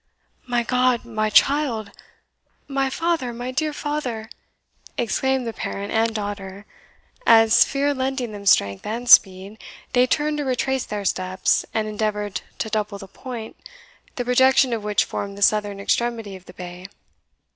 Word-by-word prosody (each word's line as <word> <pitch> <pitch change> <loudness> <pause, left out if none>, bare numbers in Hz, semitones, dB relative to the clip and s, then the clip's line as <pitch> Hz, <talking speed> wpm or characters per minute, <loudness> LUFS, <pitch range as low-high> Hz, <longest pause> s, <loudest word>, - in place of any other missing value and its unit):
"My 240 -1 +1
God, 250 0 +1
my 215 -2 -1
child!" 235 -3 +2 0.8
"My 275 -1 0
father! 325 -4 -1
my 245 +2 -5
dear 305 +4 -1
father!" 265 -7 -4 0.7
exclaimed 265 +2 0
the 230 - -4
parent 200 -1 -5
and 225 0 +1
daughter, 205 -1 -5 0.6
as, 225 0 +7
fear 285 +1 0
lending 260 -3 -2
them 200 -1 -8
strength 100 - +3
and 235 +3 -4
speed, 195 -1 +5 0.3
they 250 0 +4
turned 300 +2 0
to - - -1
retrace 265 0 -1
their 205 -1 -5
steps, 185 0 0
and 215 -1 -1
endeavoured 210 -1 -2 0.2
to 220 - -3
double 210 -2 -2
the 195 -1 -10
point, 230 +2 -8 0.6
the 245 - -3
projection 260 0 +4
of 220 -2 -3
which 210 +1 +1
formed 200 0 -5
the 200 - -1
southern 205 -1 +2
extremity 225 -1 -1
of 185 -1 -13
the 180 - -13
bay. 180 0 -9
225 Hz, 150 wpm, -22 LUFS, 205-255 Hz, 0.8 s, as